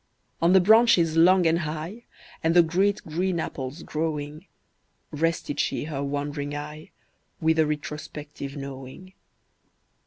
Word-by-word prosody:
On 170 +2 +4
the 190 - +8
branches 185 -5 +5
long 180 +2 +5
and 165 +1 +3
high, 160 +8 -5 0.4
And 165 +1 +2
the 175 - +8
great 190 +5 +1
green 175 +3 -1
apples 140 +1 -5
growing, 155 +1 -4 0.6
Rested 165 -1 -1
she - - 0
her 145 -2 -4
wandering 145 +1 -3
eye, 150 +1 -7 0.5
With 160 0 +2
a 155 - +4
retrospective 150 -1 -6
knowing. 140 +6 -9
160 Hz, 125 wpm, -25 LUFS, 145-170 Hz, 0.6 s, the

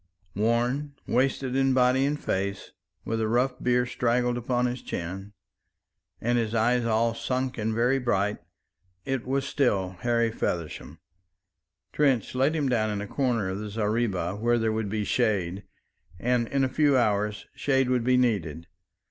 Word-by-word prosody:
Worn, 120 +7 0
wasted 130 0 0
in 135 -1 +3
body 130 +1 +3
and 150 +1 -1
face, 100 +1 -3 0.3
with 115 0 -1
a 110 - +1
rough 125 +3 0
beard 125 0 +2
straggled 120 0 +1
upon 120 +1 0
his 125 0 -2
chin, 95 +4 -6 0.9
and 120 +1 +1
his 115 0 -2
eyes 120 +2 +2
all 115 0 +2
sunk 130 +1 -2
and 110 +1 0
very 125 +4 +2
bright, 105 -4 0 0.7
it 130 -2 -2
was 135 +1 0
still 100 -11 +1
Harry 115 0 +1
Feversham. 85 -7 -4 1.0
Trench 135 -6 +1
laid 135 +5 +2
him 150 -3 0
down 115 -4 +1
in 105 -1 -2
a 105 - -4
corner 120 -5 0
of 95 +1 -3
the 105 0 -5
zareeba 105 -4 -1
where 120 +2 +2
there 110 -1 +1
would 110 -2 -2
be 105 +1 -1
shade; 100 -5 0 0.5
and 120 +3 +1
in 135 +2 0
a - - +3
few 140 +1 +3
hours 105 -3 0
shade 135 -2 +1
would 125 -2 +1
be 125 +1 +3
needed. 90 -10 0
120 Hz, 160 wpm, -27 LUFS, 105-130 Hz, 1.0 s, in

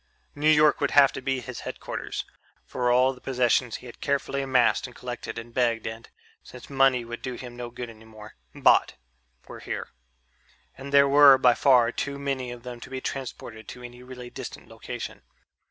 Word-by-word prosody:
New 150 +2 +1
York 150 -1 +5
would - - +2
have 140 -1 +6
to - - -7
be 130 -1 -1
his 125 -1 -7
headquarters, - - -5 0.4
for 125 -1 -1
all 130 +2 +4
the 125 - -17
possessions 125 -2 +1
he - - -9
had 120 - -12
carefully 140 0 -1
amassed 130 -1 +2
and 125 - -15
collected 125 -1 -6
and 115 0 -8
begged 120 -3 +1
and 115 +1 -7 0.3
since 125 +2 -13
money 135 -3 +3
would 120 0 -7
do 130 - -4
him 120 -1 -9
no 120 -1 -6
good 120 0 -7
any 110 -1 -14
more 110 -1 -13 0.2
bought, - - +4 0.5
were - - -9
here. - - -5 0.9
And 140 +1 -9
there 140 0 +6
were 140 -1 +8
by 125 -2 +5
far 125 -2 +4
too 140 +2 -4
many 135 -3 -3
of 120 -1 -9
them 125 -1 -8
to - - -11
be 130 0 -4
transported 120 -5 -6
to 125 - -10
any 120 0 -10
really 125 -1 -10
distant - - -8
location. - - -7
125 Hz, 190 wpm, -26 LUFS, 120-135 Hz, 0.9 s, were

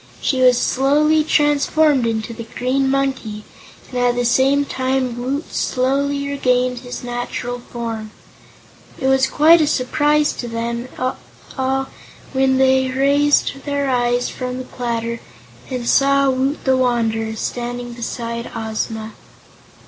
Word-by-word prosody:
She 260 -2 0
was 250 -1 +6
slowly 300 +4 +3
transformed 295 -3 +2
into 225 0 -2
the 230 0 -8
Green 265 +2 +1
Monkey, 265 -6 -1 0.5
and 250 - -2
at 245 0 +2
the 245 0 0
same 270 +4 +3
time 260 -2 -1
Woot 265 +6 -4
slowly 280 +2 0
regained 250 -3 +1
his 245 0 -8
natural 245 0 -4
form. 230 -2 -6 0.9
It 265 - -3
was 265 0 +3
quite 325 +3 +5
a 305 - +2
surprise 295 +2 +2
to 240 - -6
them 235 +1 -3 0.7
all 265 0 0 0.5
when 265 0 +2
they 260 0 +3
raised 280 +1 +2
their 285 -2 -1
eyes 245 0 +1
from 250 0 -5
the 255 - -5
platter 235 -2 -3 0.5
and 250 -3 -4
saw 275 0 +4
Woot 265 +3 -1
the 265 -1 +3
Wanderer 225 -3 0
standing 240 +1 -4
beside 235 0 -5
Ozma. 220 0 -4
255 Hz, 130 wpm, -19 LUFS, 240-275 Hz, 0.9 s, was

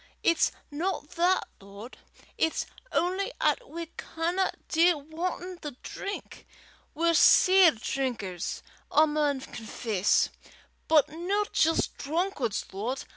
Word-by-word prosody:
it's 335 -1 +3 0.2
no 345 +7 -2
that, 355 +2 +3 0.2
Lord; 200 +5 -11 0.4
it's 320 - 0 0.3
only 375 +7 0
'at - - +1
we 335 +1 -5
canna 345 +4 -1 0.2
dee 340 +1 +4
wantin' 345 +4 -5
the 295 -2 -6
drink. 400 0 -7 0.5
We're 335 +2 +2
sair 370 +1 +7
drinkers, 220 -7 -3 0.3
I 310 - +6
maun 295 -3 0
confess, 220 -5 0 0.6
but 305 -2 +4
no 360 +7 -1
jist 325 +1 +2
drunkards, 300 - -1
Lord. 235 +7 -3
320 Hz, 110 wpm, -28 LUFS, 265-360 Hz, 0.6 s, sair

